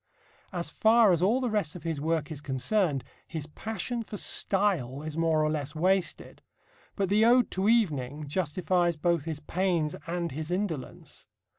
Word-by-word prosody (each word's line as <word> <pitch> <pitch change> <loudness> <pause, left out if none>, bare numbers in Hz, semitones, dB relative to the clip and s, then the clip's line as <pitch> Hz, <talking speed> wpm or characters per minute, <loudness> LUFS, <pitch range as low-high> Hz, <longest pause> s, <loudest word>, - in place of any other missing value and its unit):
As 175 -3 -3
far 220 -1 +5
as 170 -2 +2
all 215 +8 +3
the 255 - -1
rest 200 -8 -1
of 175 - -9
his 165 -4 -3
work 160 0 -1
is 150 -2 -6
concerned, 145 +2 0 0.2
his 160 -3 -5
passion 220 +8 -4
for 215 -2 -7
style 175 -12 0
is 155 -1 -5
more 160 -2 +2
or 155 - +1
less 150 0 -3
wasted. 185 +2 0 0.5
But 195 -2 0
the 210 +2 +4
Ode 245 +2 +5
to 190 +3 +1
Evening 150 - +1
justifies 175 +2 0
both 170 -1 +1
his 160 -2 -4
pains 170 -2 0
and 170 -1 -2
his 155 +4 -5
indolence. 175 -8 -4
170 Hz, 165 wpm, -28 LUFS, 150-195 Hz, 0.5 s, far